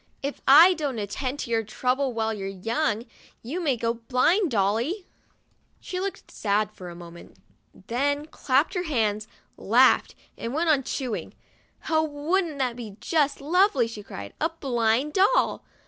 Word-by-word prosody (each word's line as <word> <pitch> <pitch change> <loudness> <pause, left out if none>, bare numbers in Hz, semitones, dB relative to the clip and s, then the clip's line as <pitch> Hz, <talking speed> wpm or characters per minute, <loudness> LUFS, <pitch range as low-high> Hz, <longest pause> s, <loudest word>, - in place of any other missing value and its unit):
"If 280 +1 -4
I 325 +7 +9
don't 290 -7 -3
at 205 -2 -4
tend 265 +3 -3
to 235 - -6
your 225 -1 +2
trouble 255 +5 -1
while 225 -1 -1
your 195 -2 -5
young, 225 +4 -1 0.4
you 300 +11 -4
may 280 -7 +1
go 230 0 0
blind, 255 - +1
Dolly! 230 - 0 0.4
" - - -45 0.3
She 365 - -5
looked 390 +1 -5
sad 210 0 0
for 180 -1 -10
a 170 - -9
mo 170 -1 -10
ment, 170 - -14 0.5
then 285 +6 0
clapped 285 0 0
her 360 -2 -2
hands, 215 -5 0 0.3
laughed, - - +4 0.2
and 235 +4 -4
went 325 +1 +2
on 285 -3 +3
chew 255 -3 -3
ing. - - -8 0.5
"Oh, 315 0 +3
wouldn't 315 +2 -1
that 255 -3 -1
be 220 -5 -9
just 295 -4 0
lovely!' 320 - +3
she 225 -2 -8
cried. 100 - -9
"A 320 - +2
blind 260 -2 0
doll! 400 +6 +2
260 Hz, 170 wpm, -25 LUFS, 220-315 Hz, 0.5 s, I